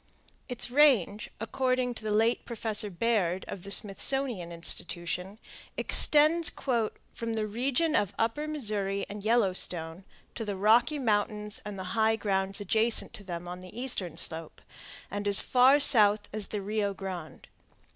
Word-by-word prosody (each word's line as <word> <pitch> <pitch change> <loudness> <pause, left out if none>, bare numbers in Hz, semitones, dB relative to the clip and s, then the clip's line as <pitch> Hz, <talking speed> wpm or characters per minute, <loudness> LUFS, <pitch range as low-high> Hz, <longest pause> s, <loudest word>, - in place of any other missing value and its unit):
Its 245 -1 0
range, 245 - +3
according 255 +2 -1
to 225 - -11
the 215 - -3
late 225 +3 +1
Professor 220 -2 -2
Baird 190 -2 -1
of 190 - -7
the 200 - -9
Smithsonian 205 -1 0
Institution, 175 +3 -3 0.4
extends 310 +3 +4 0.6
"from 230 -1 -4
the 215 -1 -1
region 265 +9 0
of 205 - +2
the - - -20
upper 295 +7 -2
Missouri 205 -9 -1
and 205 0 -8
Yellowstone 185 -6 -1 0.3
to 225 - -5
the 205 -2 -4
Rocky 225 +9 +3
Mountains 210 -3 -1
and 210 -2 -7
the 190 - -5
high 220 0 +2
grounds 195 -2 -2
adjacent 220 +3 +1
to 200 - -9
them 175 -2 -7
on 180 +1 -7
the 185 +5 -10
eastern 205 -10 -2
slope, 160 -1 -2 0.5
and 205 0 -4
as 200 -1 +8
far 260 +3 +4
south 210 -6 +5
as 215 -2 -3
the 210 -2 -5
Rio 205 -1 -2
Grande. 185 -5 -8
210 Hz, 150 wpm, -28 LUFS, 195-235 Hz, 0.6 s, as